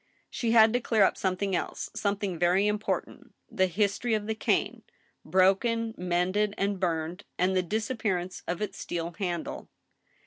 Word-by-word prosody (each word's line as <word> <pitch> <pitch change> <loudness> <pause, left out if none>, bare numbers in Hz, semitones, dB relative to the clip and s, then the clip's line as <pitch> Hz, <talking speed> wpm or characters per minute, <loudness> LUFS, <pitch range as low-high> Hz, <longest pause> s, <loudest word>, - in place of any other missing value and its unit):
She 235 - -2
had 225 -1 +6
to 245 - +2
clear 220 -3 +3
up - - +3
something 190 0 -1
else, - - -3
something 200 -4 -2
very 180 +3 +3
important, 210 +1 -3 0.2
the 190 0 +2
history 205 +5 0
of 210 -1 -2
the 220 - -1
cane, 220 - 0 0.4
broken, 195 +6 +2
mended, 185 +4 0
and 200 0 -1
burned, 170 +1 -2
and 185 +1 +2
the 185 - +3
disappearance 195 -2 -2
of 175 +4 -2
its 195 -2 -5
steel 170 0 -4
handle. 175 -4 -3
195 Hz, 150 wpm, -28 LUFS, 180-215 Hz, 0.4 s, had